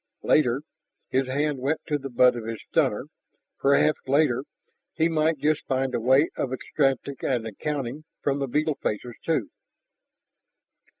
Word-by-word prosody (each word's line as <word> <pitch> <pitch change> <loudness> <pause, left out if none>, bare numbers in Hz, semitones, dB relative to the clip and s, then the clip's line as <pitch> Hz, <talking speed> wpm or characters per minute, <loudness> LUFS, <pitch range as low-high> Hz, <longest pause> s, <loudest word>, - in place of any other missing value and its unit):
Later 135 -2 +3 0.5
(his 130 0 +1
hand 145 +1 0
went 145 +5 0
to 150 -1 0
the 135 0 -6
butt 125 0 +5
of 115 -2 -5
his 115 0 -4
stunner) - - +1 0.5
perhaps 140 +2 +3
later 135 -2 +2 0.5
he 160 - +3
might 160 -1 +1
just 150 +2 +1
find 130 -1 0
a - - +1
way 130 +6 +4
of 130 - -2
extracting 135 0 -1
an 120 -4 0
accounting 140 +5 -4
from 140 0 0
the 135 - -1
beetle 150 +3 0
faces, 120 +3 -2
too. 155 -10 0
135 Hz, 145 wpm, -26 LUFS, 125-150 Hz, 0.5 s, butt